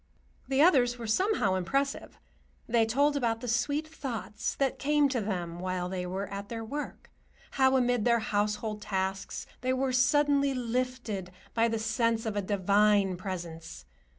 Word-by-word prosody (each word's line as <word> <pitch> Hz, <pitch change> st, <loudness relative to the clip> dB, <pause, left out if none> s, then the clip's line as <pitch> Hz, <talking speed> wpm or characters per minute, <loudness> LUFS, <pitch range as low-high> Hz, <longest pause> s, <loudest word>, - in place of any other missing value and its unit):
The 270 Hz, +2 st, +3 dB
others 250 Hz, -8 st, +4 dB
were 235 Hz, -, -6 dB
somehow 225 Hz, -, +2 dB
impressive. 275 Hz, +10 st, -1 dB, 0.5 s
They 225 Hz, -1 st, +3 dB
told 285 Hz, +6 st, +2 dB
about 235 Hz, -5 st, 0 dB
the 250 Hz, -, -5 dB
sweet 285 Hz, +7 st, 0 dB
thoughts 230 Hz, -, -4 dB
that 270 Hz, -2 st, 0 dB
came 295 Hz, 0 st, +3 dB
to 255 Hz, -3 st, -1 dB
them 175 Hz, -4 st, -3 dB
while 180 Hz, 0 st, -2 dB
they 180 Hz, -1 st, -3 dB
were 190 Hz, +2 st, -3 dB
at 200 Hz, +1 st, -6 dB
their 225 Hz, -1 st, -5 dB
work; 290 Hz, +6 st, -6 dB, 0.4 s
how, 265 Hz, -1 st, +3 dB
amid 245 Hz, -3 st, +2 dB
their 235 Hz, 0 st, +4 dB
household 210 Hz, 0 st, -1 dB
tasks, 190 Hz, -1 st, -3 dB, 0.2 s
they 255 Hz, +1 st, +1 dB
were 260 Hz, 0 st, 0 dB
suddenly 280 Hz, +1 st, +3 dB
lifted 245 Hz, -5 st, -2 dB, 0.2 s
by 230 Hz, 0 st, +3 dB
the 225 Hz, 0 st, -1 dB
sense 225 Hz, +1 st, 0 dB
of 220 Hz, -2 st, -2 dB
a 205 Hz, -, +1 dB
divine 200 Hz, 0 st, +3 dB
Presence. 170 Hz, -, -7 dB
225 Hz, 155 wpm, -29 LUFS, 200-260 Hz, 0.5 s, others